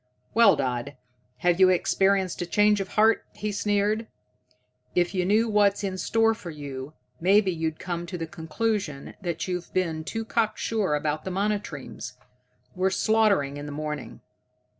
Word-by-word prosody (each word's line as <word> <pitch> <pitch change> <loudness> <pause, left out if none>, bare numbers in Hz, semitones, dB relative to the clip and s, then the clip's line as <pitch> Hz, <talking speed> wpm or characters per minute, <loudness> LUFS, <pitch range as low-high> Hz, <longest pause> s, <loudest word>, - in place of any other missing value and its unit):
"Well, 225 -5 +6
Dodd, 130 0 -2 0.5
have 175 0 +3
you 185 -1 +7
experienced 190 +1 +2
a 175 - -3
change 210 +2 +3
of 195 - -6
heart?" 220 +1 +4
he 210 0 -3
sneered. 205 +2 0 0.9
"If 175 +1 +2
you 180 -2 0
knew 220 +3 +3
what's 205 -1 +3
in 190 -2 -2
store 225 +4 +3
for 210 -6 -9
you, 140 -2 -7 0.3
maybe 195 +2 +4
you'd 160 -2 -2
come 175 -1 -4
to 180 +1 -5
the 165 - -3
conclusion 160 -1 -3
that 170 -2 -3
you've 180 -1 -4
been 165 -4 0
too 225 +7 -4
cocksure 220 -5 0
about 150 +1 -2
the - - -4
monotremes. 200 -6 -3 0.6
We're 185 +1 +2
slaughtering 200 -9 +2
in 145 0 -6
the - - -6
morning." 150 -1 -5
185 Hz, 155 wpm, -26 LUFS, 160-210 Hz, 0.9 s, you